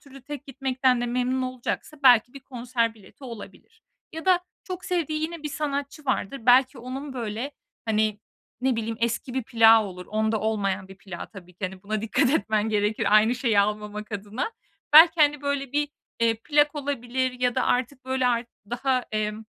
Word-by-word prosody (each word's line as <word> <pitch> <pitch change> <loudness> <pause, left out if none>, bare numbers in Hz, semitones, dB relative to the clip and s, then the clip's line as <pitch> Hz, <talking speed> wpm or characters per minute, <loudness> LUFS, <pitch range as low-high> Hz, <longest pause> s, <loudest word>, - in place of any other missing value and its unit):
türlü 275 -2 -15
tek 290 0 -8
gitmekten 260 -2 +1
de 245 - -1
memnun 250 +2 0
olacaksa 255 +4 -4
belki 245 -2 +6
bir 275 - -9
konser 240 -3 -2
bileti 220 +7 -16
olabilir. 240 - -11 0.3
Ya 320 +2 -7
da 365 -1 +4 0.2
çok 370 -1 -6
sevdiği 315 -3 -1
yine 330 -1 -4
bir 300 - -3
sanatçı 285 0 -4
vardır, 260 0 -1
belki 255 +1 +5
onun, 265 +3 -6
böyle, 235 +2 -4 0.3
hani, 215 -1 0 0.4
ne 260 -2 +1
bileyim, 225 0 -3
eski 235 +3 -1
bir 260 - 0
plağı 225 -1 +6
olur, 180 -2 -8
onda 220 0 0
olmayan 200 -3 -1
bir 195 0 -13
plağı 185 -4 -8
tabii 180 -3 -13
ki. 185 - -5
Hani, 185 0 -6
buna 215 +1 -3
dikkat 245 +4 +2
etmen 215 -5 +1
gerekir 210 0 +1
aynı 220 +3 +4
şeyi 235 -5 +2
almamak 210 +1 -3
adına. 210 - -4 0.4
Belki, 325 +1 +8
hani, 295 -1 +4
böyle, 280 -2 -2
bir, 295 0 +1 0.3
eee, 230 -1 +3
plak 295 0 +3
olabilir 260 -3 -2
ya 245 -1 +2
da 255 - +1
artık, 255 +1 -1
böyle, 260 -1 0
artık 235 -1 0 0.2
daha, 255 0 0
emm, 215 +1 -2
245 Hz, 180 wpm, -25 LUFS, 215-275 Hz, 0.4 s, Belki